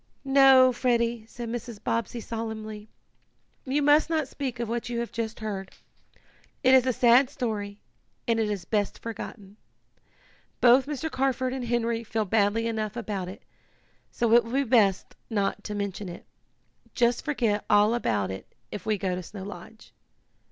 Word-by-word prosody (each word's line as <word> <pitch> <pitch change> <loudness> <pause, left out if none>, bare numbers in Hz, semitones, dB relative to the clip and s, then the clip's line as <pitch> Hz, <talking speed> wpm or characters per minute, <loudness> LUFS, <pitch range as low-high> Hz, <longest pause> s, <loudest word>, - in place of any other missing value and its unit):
"No, 270 -2 +6
Freddie," 235 -2 0
said 240 +1 -7
Mrs. 240 -1 -5
Bobbsey 230 +1 -2
solemnly. 220 -2 -6 0.8
"You 280 +2 0
must 295 +3 +4
not 315 -4 0
speak 260 -3 -5
of 235 - -2
what 235 +2 -3
you 240 - -3
have 235 - -4
just 225 -1 -4
heard. 195 -3 -4 0.9
It 260 0 +5
is 260 -1 +6
a - - +4
sad 245 +2 +5
story, 210 -6 -4 0.5
and 230 -1 +2
is 210 -5 -1
best 205 -2 -1
forgotten. 210 -3 -8 1.0
Both 255 +2 +5
Mr. 300 +2 -3
Carford 260 -1 0
and 260 -2 -4
Henry 235 -1 0
feel 220 -1 -2
badly 210 +2 +2
enough 220 -2 -2
about 200 -5 -3
it, 190 - -11 0.7
so 235 -1 0
it 235 0 +7
will 230 +2 -8
be 275 +1 +2
best 220 -7 +2
not 200 -4 -1
to 210 - -4
mention 200 -1 -4
it. 175 - -10 0.7
Just 235 -1 +2
forget 230 -8 0
all 210 +2 +5
about 105 - 0
it 95 - -9 0.2
if 205 - -7
we 215 -1 +1
go 185 -1 -1
to 180 - -3
Snow 190 +2 -9
Lodge." 210 +2 -11
230 Hz, 160 wpm, -27 LUFS, 210-250 Hz, 1.0 s, it